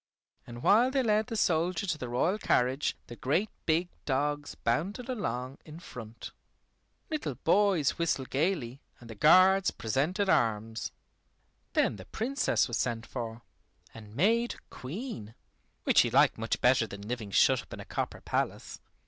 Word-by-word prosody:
And 120 0 -9
while 235 +5 +5
they 265 0 +1
led 215 -1 +2
the 230 - -4
soldier 175 -1 +1
to 165 -5 -1
the 125 - -5
royal 170 - +1
carriage 130 -1 +1
the 120 - -10
great 165 - 0 0.2
big 165 +2 +2 0.2
dogs 145 +1 -1
bounded 190 - -2
along 135 - -3
in 155 +1 -11
front. 115 -8 -9 0.8
Little 290 - -2
boys 170 - +2
whistled 160 -6 -1
gaily, 140 -4 -1 0.2
and 115 -1 -11
the - - -6
guards 185 - +5
presented 150 - -1
arms. 110 - 0 0.8
Then - - +2
the 95 - -10
Princess 270 +6 0
was 120 -2 -2
sent 115 -2 -2
for, 115 -2 -6 0.5
and 105 -1 -12
made 230 - +2 0.2
Queen, 130 - -7 0.5
which - - +4
she - - +5
liked - - +4
much - - -2
better - - +4
than 100 +1 -9
living 115 -3 -4
shut 95 - +4
up - - -20
in - - -7
a - - -8
copper - - -4
palace. - - -3
145 Hz, 155 wpm, -30 LUFS, 120-195 Hz, 0.8 s, while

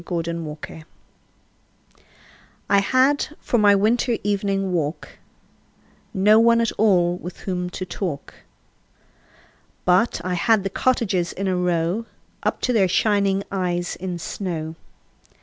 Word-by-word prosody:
Good 170 -1 -3
Hours 160 -1 -6 1.8
I 200 - +4
HAD 265 +8 +1
for 240 - 0
my 205 -1 +6
winter 230 +3 +2
evening 195 -2 0
walk 155 -2 -3 0.9
No 210 +1 +5
one 230 0 +5
at 230 -1 +1
all 180 -5 +2
with 180 0 -9
whom 180 -2 -3
to 185 - -5
talk, 175 -6 -5 1.5
But 180 +5 +3
I 185 - -1
had 200 +4 +2
the 195 - -3
cottages 195 -8 0
in 195 +1 -3
a 185 - +1
row 180 +4 0 0.3
Up - - -1
to 250 - +1
their 200 -5 +4
shining 200 0 +2
eyes 175 -2 -2
in 180 -1 -5
snow. 165 -2 -4
190 Hz, 125 wpm, -22 LUFS, 175-215 Hz, 1.8 s, my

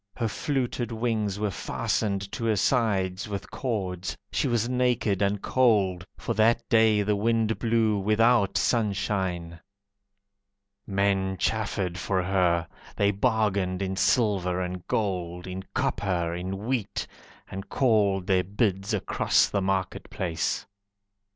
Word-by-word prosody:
Her 115 - 0
fluted 125 0 -2
wings 110 -3 -1
were 105 -1 -1
fastened 100 -1 -2
to 115 - -4
her 110 -1 +2
sides 100 -5 +1
with 100 -1 -5
cords, 95 -8 -3
She - - 0
was 120 -2 +1
naked 125 -5 +1
and 100 0 0
cold, 100 -8 +2
For - - -3
that 115 +2 +2
day 110 -3 +4
the 105 +1 +1
wind 110 +1 +1
blew 110 -3 +2
Without 110 +1 +3
sunshine. 95 -6 -1 1.3
Men 95 -1 +1
chaffered 95 -4 -1
for 95 +1 0
her, 90 -3 +1 0.3
They 100 0 +3
bargained 100 -2 0
in 95 0 -2
silver 95 -5 +2
and 90 -1 -4
gold, 90 -4 -2
In 95 0 -5
copper, 85 -4 0
in 95 +4 -4
wheat, 120 -5 -2 0.5
And 95 +1 -7
called 105 -7 +2
their 95 -1 +2
bids 100 +1 0
across 100 - +2
the 100 - 0
market 95 -1 -2
place. 85 -3 -2
100 Hz, 125 wpm, -26 LUFS, 95-110 Hz, 1.3 s, day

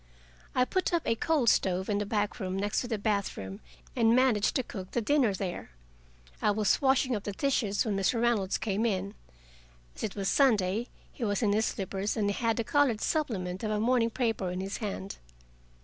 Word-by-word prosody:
I 250 - +4
put 370 +5 -1
up 335 - 0
a - - +2
coal 290 +3 +1
stove 190 -4 +2
in 205 -1 0
a 205 - -3
back 210 0 -1
room 190 -2 -3
next 205 +1 0
the 235 -3 -2
bathroom, 200 - -2 0.4
and 230 0 +4
managed 250 -5 +3
to 260 - +1
cook 190 -5 -8
the - - -1
dinner 255 -1 +2
there. 185 -2 -5 0.7
I - - +3
was 210 0 +2
washing 265 -2 +3
up 205 - -4
the 205 - -4
dishes 215 -4 0
when 210 -3 -1
Mr. 195 +5 +1
Reynolds 225 -5 +1
came 220 +2 0
in. 195 -1 -2 0.8
As - - -10
it 210 - -3
was 195 -2 -2
Sunday, 220 -4 +2 0.2
he 250 - -7
was 205 +1 0
in 205 -2 +3
his 220 +1 +2
slippers 195 +1 -2
and 205 -2 +1
had 225 +1 0
the 230 - 0
colored 270 -3 +2
supplement 195 - -2
of 215 - -1
a 210 0 0
morning 230 +1 +2
paper 225 -6 -1
in 180 +1 -4
his 195 +1 -4
hand. 200 -2 -5
215 Hz, 195 wpm, -29 LUFS, 195-240 Hz, 0.8 s, I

